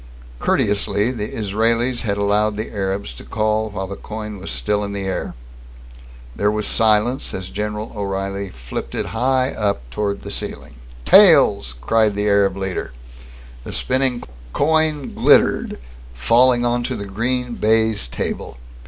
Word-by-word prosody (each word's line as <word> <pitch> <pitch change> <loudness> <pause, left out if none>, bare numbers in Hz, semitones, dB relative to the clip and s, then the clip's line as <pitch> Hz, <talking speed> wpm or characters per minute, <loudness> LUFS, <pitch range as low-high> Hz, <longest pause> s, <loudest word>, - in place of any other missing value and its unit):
Courteously, 105 - +1
the 110 -4 -4
Israelis 115 +4 0
had 100 -4 -1
allowed 105 +1 +1
the 110 - -4
Arabs 100 0 -3
to - - -12
call 110 0 -1
while 95 -2 -4
the 100 +1 -6
coin 105 -1 -7
was 95 - -7
still 65 +12 -1
in 100 0 -4
the 100 -1 -4
air. 95 -9 -3 1.0
There 105 - +1
was 105 0 -1
silence 110 +4 +2
as 95 -1 -6
General 105 +1 -4
O'Reilly 100 -1 -3
flipped 60 -7 -7
it - - -1
high 130 0 0
up 100 - -2
towards 100 +5 -2
the - - -6
ceiling. - - -6 0.3
"Tails!" 60 -2 +6
cried 110 - +2
the 105 +1 0
Arab 100 -2 +3
leader. 95 -9 -4 0.7
The - - -7
spinning 130 -1 0 0.3
coin 155 -1 +1
glittered, - - +3 0.4
falling 120 - +4
onto 120 0 -1
the 100 - -5
green 120 +5 -2
baize 110 - +1
table. - - -4
105 Hz, 145 wpm, -20 LUFS, 100-115 Hz, 1.0 s, Tails